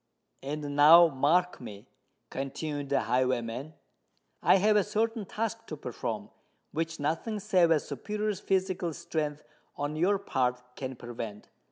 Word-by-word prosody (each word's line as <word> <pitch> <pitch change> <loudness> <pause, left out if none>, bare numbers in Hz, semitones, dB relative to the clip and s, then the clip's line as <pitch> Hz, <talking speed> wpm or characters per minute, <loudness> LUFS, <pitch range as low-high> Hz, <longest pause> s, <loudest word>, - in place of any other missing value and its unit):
"And 145 +1 -4
now 165 +4 +8
mark 160 +6 +1
me," 100 -1 -10 0.4
continued 140 +1 -4
the 140 - +2
highwayman: 130 +3 -1 0.7
"I - - +6
have 210 +3 +4
a 205 - +5
certain 220 +1 -1
task 225 +1 -3
to 155 - -6
perform, 115 -5 -5 0.4
which 165 +1 -3
nothing 165 +9 -1
save 180 -3 +3
a 160 -2 +4
superior 210 - -3
physical 185 -3 -1
strength 150 -2 -3 0.3
on 145 +1 -3
your 185 +6 +2
part 125 -8 -2
can 130 -1 -5
prevent. 115 -3 -7
150 Hz, 135 wpm, -29 LUFS, 130-185 Hz, 0.7 s, now